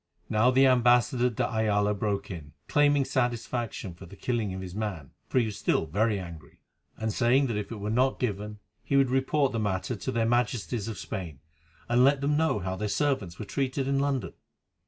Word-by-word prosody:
Now 110 Hz, +4 st, +4 dB
the 130 Hz, +1 st, +5 dB
ambassador 125 Hz, -1 st, +4 dB
de 115 Hz, -, -1 dB
Ayala 105 Hz, -3 st, +1 dB
broke 100 Hz, 0 st, -2 dB
in, 75 Hz, -5 st, -8 dB
claiming 145 Hz, -2 st, +3 dB
satisfaction 120 Hz, -6 st, -2 dB
for 85 Hz, +2 st, -12 dB
the 100 Hz, -, -12 dB
killing 115 Hz, -2 st, -1 dB
of 95 Hz, 0 st, -5 dB
his 90 Hz, -1 st, -7 dB
man, 95 Hz, -10 st, -4 dB, 0.2 s
for -, -, -2 dB
he 120 Hz, -, +4 dB
was 105 Hz, -2 st, -5 dB
still -, -, +1 dB
very 105 Hz, +7 st, +1 dB
angry, 85 Hz, -5 st, -10 dB, 0.4 s
and 110 Hz, -1 st, -2 dB
saying 130 Hz, +4 st, +3 dB
that 115 Hz, -4 st, -2 dB
if 105 Hz, 0 st, -4 dB
it -, -, -4 dB
were 105 Hz, +1 st, -3 dB
not 130 Hz, +3 st, +2 dB
given, 105 Hz, -2 st, -3 dB, 0.3 s
he 140 Hz, -, +1 dB
would 135 Hz, -2 st, +3 dB
report 135 Hz, +1 st, +2 dB
the 115 Hz, -, -2 dB
matter 100 Hz, +2 st, -1 dB
to 100 Hz, -, -4 dB
their 115 Hz, -1 st, +1 dB
Majesties 120 Hz, -2 st, 0 dB
of 115 Hz, -, -5 dB
Spain, 85 Hz, -9 st, -6 dB, 0.5 s
and 120 Hz, +1 st, +4 dB
let 140 Hz, +1 st, +4 dB
them 145 Hz, +2 st, +1 dB
know 160 Hz, -5 st, +2 dB
how 95 Hz, -1 st, -3 dB
their 105 Hz, +2 st, -3 dB
servants 105 Hz, -, -1 dB
were 110 Hz, -, -6 dB
treated 135 Hz, +3 st, -2 dB
in 135 Hz, 0 st, +1 dB
London. 140 Hz, -2 st, -1 dB
115 Hz, 200 wpm, -28 LUFS, 100-130 Hz, 0.5 s, the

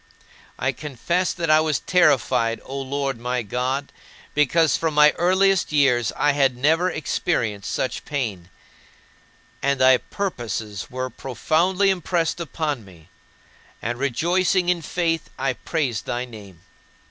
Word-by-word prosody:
I 130 Hz, -, 0 dB
confess 155 Hz, +6 st, -2 dB
that 165 Hz, -3 st, -1 dB
I 155 Hz, -, +6 dB
was 155 Hz, -2 st, +1 dB
terrified, 130 Hz, -9 st, +2 dB
O 135 Hz, +1 st, -5 dB
Lord 135 Hz, -2 st, -2 dB
my 125 Hz, 0 st, -2 dB
God, 130 Hz, +6 st, -2 dB, 0.4 s
because 150 Hz, +2 st, +3 dB
from 160 Hz, -2 st, -1 dB
my 150 Hz, 0 st, +7 dB
earliest 190 Hz, +2 st, +2 dB
years 125 Hz, -6 st, +3 dB
I 145 Hz, -, +3 dB
had 135 Hz, -3 st, +2 dB
never 160 Hz, +7 st, +2 dB
experienced 110 Hz, -, -2 dB
such 130 Hz, -, -2 dB
pain. 105 Hz, -12 st, -4 dB, 1.1 s
And 140 Hz, -1 st, +1 dB
thy 130 Hz, 0 st, +6 dB
purposes 115 Hz, -, -4 dB
were 130 Hz, 0 st, -4 dB
profoundly 175 Hz, -, +1 dB
impressed 175 Hz, -2 st, -1 dB
upon 155 Hz, -6 st, -3 dB
me; 90 Hz, -4 st, -17 dB, 0.7 s
and 120 Hz, +2 st, -4 dB
rejoicing 175 Hz, +7 st, +1 dB
in 180 Hz, -2 st, +1 dB
faith, 165 Hz, 0 st, -1 dB
I 135 Hz, -1 st, 0 dB
praised 130 Hz, -6 st, -2 dB
thy 120 Hz, +1 st, -2 dB
name. 100 Hz, -8 st, -13 dB
140 Hz, 130 wpm, -23 LUFS, 120-165 Hz, 1.1 s, my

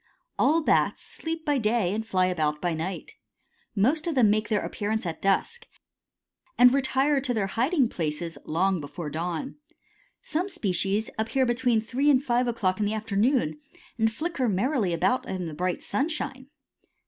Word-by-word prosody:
All 315 Hz, +4 st, +3 dB
Bats -, -, +2 dB
sleep 325 Hz, 0 st, -5 dB
by 290 Hz, -2 st, +2 dB
day 215 Hz, -4 st, +1 dB
and 220 Hz, +1 st, -2 dB
fly 185 Hz, -4 st, +1 dB
about 155 Hz, -5 st, 0 dB
by 175 Hz, 0 st, -1 dB
night. 165 Hz, +4 st, -5 dB, 0.6 s
Most 285 Hz, -, +2 dB
of 330 Hz, -, -1 dB
them 230 Hz, -6 st, +5 dB
make 215 Hz, 0 st, 0 dB
their 210 Hz, -2 st, +1 dB
appearance 215 Hz, 0 st, -2 dB
at 165 Hz, -2 st, -4 dB
dusk, 460 Hz, -, 0 dB, 0.9 s
and 245 Hz, +1 st, +7 dB
retire 275 Hz, +1 st, +2 dB
to 255 Hz, -3 st, -1 dB
their 210 Hz, -3 st, +1 dB
hiding 255 Hz, -, +1 dB
places 165 Hz, -2 st, -3 dB
long 180 Hz, +2 st, 0 dB
before 150 Hz, +2 st, -6 dB
dawn. 170 Hz, -, -4 dB, 0.7 s
Some 355 Hz, +6 st, -2 dB
species 205 Hz, -, -1 dB
appear 255 Hz, +4 st, +1 dB
between 240 Hz, -2 st, +2 dB
three 260 Hz, +6 st, 0 dB
and 270 Hz, -2 st, +4 dB
five 245 Hz, -1 st, +2 dB
o'clock 200 Hz, -5 st, 0 dB
in 210 Hz, -, +1 dB
the 215 Hz, -, -1 dB
afternoon 215 Hz, -, +1 dB, 0.4 s
and 225 Hz, 0 st, +3 dB
flicker 275 Hz, -1 st, -1 dB
merrily 215 Hz, -, +1 dB
about 185 Hz, +9 st, +1 dB
in 185 Hz, -2 st, -3 dB
the 160 Hz, -, -6 dB
bright 180 Hz, +3 st, -2 dB
sunshine. 275 Hz, -3 st, -3 dB
220 Hz, 160 wpm, -26 LUFS, 185-265 Hz, 0.9 s, and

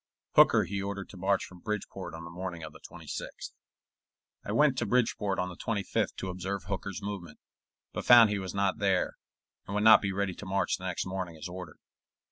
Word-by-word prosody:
Hooker -, -, +7 dB
he 100 Hz, 0 st, -3 dB
ordered 100 Hz, 0 st, -4 dB
to 100 Hz, -, -11 dB
march 95 Hz, +1 st, +1 dB
from 90 Hz, -, -13 dB
Bridgeport 105 Hz, -3 st, -5 dB
on 80 Hz, -, -8 dB
the 85 Hz, -, -8 dB
morning 90 Hz, -1 st, -5 dB
of 75 Hz, -, -8 dB
the -, -, -13 dB
26th. -, -, -7 dB, 0.9 s
I -, -, -4 dB
went 150 Hz, -3 st, +4 dB
to 120 Hz, -, -1 dB
Bridgeport 105 Hz, -4 st, +1 dB
on 90 Hz, 0 st, -1 dB
the 90 Hz, -, -8 dB
25th 100 Hz, +1 st, -1 dB
to 95 Hz, -, -4 dB
observe 95 Hz, +1 st, -4 dB
Hooker's 100 Hz, +2 st, -4 dB
movement, 100 Hz, -4 st, -6 dB, 0.6 s
but -, -, -3 dB
found 115 Hz, -3 st, +8 dB
he 100 Hz, -, 0 dB
was 95 Hz, -1 st, -5 dB
not 100 Hz, +2 st, +1 dB
there, 95 Hz, -3 st, +1 dB, 0.5 s
and 100 Hz, -, -4 dB
would 105 Hz, -, +1 dB
not 110 Hz, 0 st, +9 dB
be 100 Hz, -, -1 dB
ready 100 Hz, -1 st, -1 dB
to 105 Hz, -, -9 dB
march 100 Hz, +1 st, +1 dB
the 95 Hz, -, -9 dB
next 90 Hz, -, -2 dB
morning 95 Hz, -3 st, -4 dB
as 80 Hz, -, -6 dB
ordered. 90 Hz, -2 st, -8 dB
95 Hz, 205 wpm, -30 LUFS, 90-100 Hz, 0.9 s, not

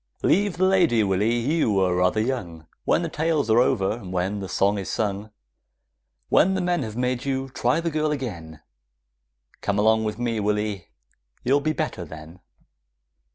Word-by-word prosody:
Leave 200 Hz, 0 st, +2 dB
the 185 Hz, -, +3 dB
lady, 175 Hz, -, +3 dB
Willy, 105 Hz, +4 st, +1 dB
you 120 Hz, -5 st, +1 dB
are 90 Hz, -2 st, +2 dB
rather 90 Hz, +4 st, +2 dB
young; 100 Hz, -10 st, -3 dB, 0.2 s
When 175 Hz, -, +2 dB
the -, -, -1 dB
tales 155 Hz, -6 st, 0 dB
are 115 Hz, -, +5 dB
over, 115 Hz, -3 st, +1 dB
when 95 Hz, 0 st, -3 dB
the 95 Hz, -1 st, -6 dB
songs 100 Hz, +1 st, +1 dB
are 95 Hz, -, -5 dB
sung, 105 Hz, 0 st, -2 dB, 1.0 s
When 190 Hz, +3 st, +4 dB
the -, -, 0 dB
men 175 Hz, -2 st, 0 dB
have 110 Hz, -4 st, -5 dB
made 125 Hz, 0 st, -1 dB
you, 135 Hz, -1 st, -2 dB
try 125 Hz, +3 st, 0 dB
the 165 Hz, 0 st, -2 dB
girl 155 Hz, 0 st, 0 dB
again; 85 Hz, -, -5 dB, 1.0 s
Come 100 Hz, -1 st, -1 dB
along 110 Hz, +1 st, +3 dB
with 105 Hz, -1 st, -3 dB
me, 120 Hz, -2 st, -1 dB
Willy, 105 Hz, -3 st, -1 dB, 0.6 s
you'll 140 Hz, +3 st, +3 dB
be 155 Hz, +2 st, 0 dB
better 155 Hz, -, -3 dB
then! 80 Hz, +2 st, -11 dB
110 Hz, 165 wpm, -24 LUFS, 100-145 Hz, 1.0 s, are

